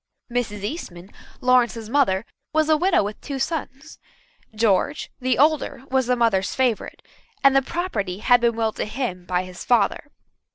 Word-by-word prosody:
Mrs. 215 Hz, -4 st, -2 dB
Eastman, 200 Hz, -, -6 dB, 0.3 s
Lawrence's 240 Hz, -3 st, +2 dB
mother, 225 Hz, -6 st, +2 dB, 0.3 s
was 315 Hz, 0 st, +3 dB
a 310 Hz, -, +6 dB
widow 355 Hz, -, +2 dB
with 205 Hz, +1 st, -6 dB
two 280 Hz, -2 st, -5 dB
sons. 295 Hz, +1 st, -4 dB, 0.6 s
George, 220 Hz, +6 st, +1 dB
the 255 Hz, -1 st, 0 dB
older, 290 Hz, -2 st, +2 dB
was 260 Hz, -2 st, +2 dB
the 250 Hz, -, +3 dB
mother's 225 Hz, -6 st, +1 dB
favourite, 250 Hz, -5 st, -1 dB, 0.4 s
and 275 Hz, 0 st, +6 dB
the 270 Hz, -, +6 dB
property 245 Hz, -, -3 dB
had 245 Hz, +3 st, +4 dB
been 235 Hz, -1 st, +2 dB
willed 225 Hz, -1 st, -1 dB
to -, -, -1 dB
him 210 Hz, -6 st, -4 dB
by 180 Hz, 0 st, 0 dB
his 185 Hz, -1 st, -9 dB
father. 240 Hz, +4 st, +1 dB
245 Hz, 160 wpm, -23 LUFS, 205-275 Hz, 0.6 s, a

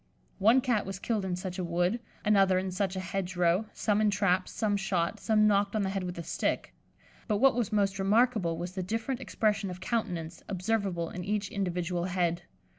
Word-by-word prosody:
One 225 Hz, +6 st, +5 dB
Cat 240 Hz, -7 st, 0 dB
was 195 Hz, -1 st, -4 dB
killed 215 Hz, +1 st, -1 dB
in 180 Hz, -1 st, -1 dB
such 185 Hz, 0 st, -5 dB
a -, -, -1 dB
wood; 175 Hz, +6 st, 0 dB, 0.3 s
another 195 Hz, -3 st, +4 dB
in 185 Hz, 0 st, -1 dB
such 190 Hz, 0 st, -1 dB
a -, -, -2 dB
hedge 185 Hz, 0 st, -3 dB
row; 175 Hz, +4 st, +2 dB
some 210 Hz, -1 st, +1 dB
in 215 Hz, -, +4 dB
traps, 190 Hz, -2 st, +1 dB
some 210 Hz, -2 st, 0 dB
shot, 195 Hz, 0 st, -1 dB
some 215 Hz, 0 st, +3 dB
knocked 205 Hz, 0 st, +2 dB
on 215 Hz, -, +1 dB
the 190 Hz, -, -1 dB
head 195 Hz, -1 st, -2 dB
with 180 Hz, -1 st, -5 dB
a 170 Hz, -, -4 dB
stick; -, -, -2 dB, 0.5 s
but 210 Hz, -3 st, +1 dB
what 270 Hz, +4 st, +5 dB
was 235 Hz, -3 st, -1 dB
most 200 Hz, -2 st, +1 dB
remarkable 205 Hz, -4 st, +2 dB
was 175 Hz, +1 st, -4 dB
the 185 Hz, 0 st, -4 dB
different 225 Hz, +7 st, -2 dB
expression 210 Hz, -5 st, 0 dB
of 180 Hz, 0 st, -7 dB
countenance 175 Hz, -6 st, -3 dB
observable 190 Hz, -3 st, -1 dB
in 180 Hz, -, -5 dB
each 205 Hz, +1 st, -1 dB
individual 180 Hz, -2 st, -2 dB
head. 175 Hz, -2 st, 0 dB
195 Hz, 200 wpm, -29 LUFS, 180-215 Hz, 0.5 s, One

